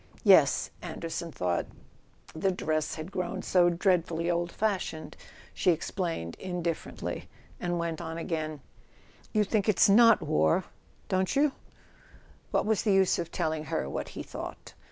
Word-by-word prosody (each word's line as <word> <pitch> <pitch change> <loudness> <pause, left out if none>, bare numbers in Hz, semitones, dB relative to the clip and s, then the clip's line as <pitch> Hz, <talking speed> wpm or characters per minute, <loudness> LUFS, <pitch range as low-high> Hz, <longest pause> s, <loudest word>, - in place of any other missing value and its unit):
"Yes. - - +5
Anderson 165 0 -5
thought... 90 - -1 0.7
the 160 +5 0
dress 155 -4 -1
had 160 +4 -7
grown 185 +1 -3
so 175 -1 +4
dreadfully 175 -1 +1
old 170 0 -1
fashioned," 190 -7 -2 0.4
she - - +1
explained 165 - -1
indiffer¬ 175 -3 -3
ently; - - -5 0.3
and 175 0 -1
went 170 -1 -2
on 160 0 -5
again: 155 -3 -3 0.7
"You 215 - +3
think 210 +1 0
it's 205 - +5
not 230 +2 +7
war: 80 - +2 0.4
don't 185 +6 0
you?" 290 +1 +4 1.0
What - - +1
was 220 -1 +2
the 210 - +1
use 190 -2 +3
of 170 -1 -4
telling 155 -1 -1
her 70 - -2
what 70 - -4
he - - -4
thought? - - -8
175 Hz, 145 wpm, -29 LUFS, 160-190 Hz, 1.0 s, not